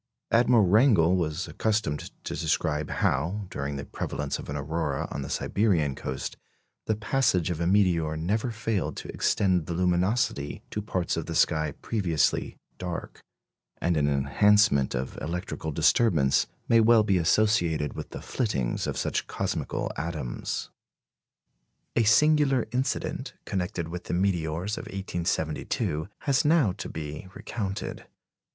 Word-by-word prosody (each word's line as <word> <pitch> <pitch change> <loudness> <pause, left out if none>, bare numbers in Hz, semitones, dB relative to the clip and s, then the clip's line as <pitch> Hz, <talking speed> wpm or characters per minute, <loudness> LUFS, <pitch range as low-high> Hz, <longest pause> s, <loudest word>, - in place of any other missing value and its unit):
Admiral 120 -2 +5
Wrangel 95 - +5
was 85 -1 -1
accustomed 110 -9 -1
to - - -4
describe 75 -1 0
how, 90 +9 0
during 70 +1 -3
the 70 0 -5
prevalence 75 +1 -3
of - - -8
an 70 - -3
aurora 75 -1 -2
on - - -4
the 70 - -5
Siberian 85 -4 +1
coast, 65 0 -5 0.5
the 110 - +2
passage 105 - +1
of 85 - -3
a 85 - +1
meteor 85 -5 +2
never 105 +9 0
failed 115 -4 -2
to - - -7
extend 90 -5 +1
the 85 - -3
luminosity 90 -3 0
to 105 - -2
parts 95 -4 -2
of - - -3
the - - -4
sky 80 -2 +2
previously 90 -9 0 0.2
dark; 90 -2 -5 0.6
and 85 0 +1
an 75 -2 +2
enhancement 70 +2 +3
of 65 +2 -4
electrical 85 -1 -4
disturbance 70 - +3 0.2
may 115 - +5
well 115 0 +6
be 100 -3 +2
associated 85 - +2
with - - -7
the - - -8
flittings 70 - -1
of - - -3
such - - -1
cosmical - - -2
atoms. 75 -6 -4 1.2
A - - +4
singular 140 +2 +4
incident 130 +3 -2
connected 90 -3 -2
with 90 +1 -6
the - - -2
meteors 90 +1 0
of - - -8
1872 85 -3 -2
has 135 -2 +2
now 150 - +4
to - - -6
be 75 +2 -6
recounted. 100 -4 -5
90 Hz, 140 wpm, -27 LUFS, 75-105 Hz, 1.2 s, well